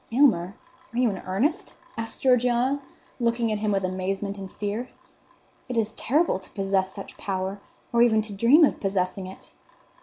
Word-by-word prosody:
"Aylmer, 225 Hz, -8 st, +3 dB, 0.4 s
are 235 Hz, -, -6 dB
you 245 Hz, -3 st, +3 dB
in 190 Hz, -, -5 dB
earnest?" 300 Hz, -, 0 dB, 0.2 s
asked 225 Hz, 0 st, -5 dB
Georgiana, 250 Hz, +2 st, +3 dB, 0.4 s
looking 235 Hz, -1 st, +1 dB
at 210 Hz, -, -1 dB
him 210 Hz, 0 st, 0 dB
with 195 Hz, -1 st, +1 dB
amazement 190 Hz, +2 st, -2 dB
and 195 Hz, -1 st, -7 dB
fear. 215 Hz, +4 st, -3 dB, 0.8 s
"It 250 Hz, -, -2 dB
is 220 Hz, -1 st, +1 dB
terrible 290 Hz, -, +1 dB
to 190 Hz, -, -17 dB
possess 195 Hz, -1 st, 0 dB
such 200 Hz, -, -9 dB
power, 190 Hz, 0 st, -3 dB, 0.3 s
or 235 Hz, -, +4 dB
even 220 Hz, -2 st, +5 dB
to 210 Hz, -1 st, -8 dB
dream 245 Hz, -, +6 dB
of -, -, -1 dB
possessing 190 Hz, -1 st, -1 dB
it." 190 Hz, -, -12 dB
215 Hz, 170 wpm, -26 LUFS, 195-245 Hz, 0.8 s, dream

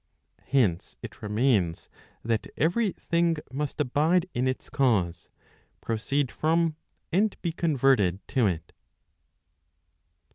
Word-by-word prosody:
Hence 105 Hz, -11 st, +1 dB
it -, -, -9 dB
remains 105 Hz, -5 st, +1 dB, 0.4 s
that 115 Hz, -1 st, -1 dB
every 195 Hz, +7 st, +2 dB
thing 170 Hz, 0 st, +1 dB, 0.2 s
must 145 Hz, +2 st, -3 dB
abide 155 Hz, +6 st, +2 dB
in 125 Hz, +2 st, 0 dB
its 130 Hz, -, -3 dB
cause, 110 Hz, -, 0 dB, 0.5 s
proceed 125 Hz, +4 st, -1 dB
from, 165 Hz, 0 st, +1 dB, 0.4 s
and 200 Hz, +4 st, +1 dB
be 170 Hz, -, 0 dB
converted 135 Hz, -, +2 dB
to 125 Hz, -6 st, +2 dB
it. 85 Hz, -4 st, -3 dB
135 Hz, 105 wpm, -27 LUFS, 110-160 Hz, 0.5 s, every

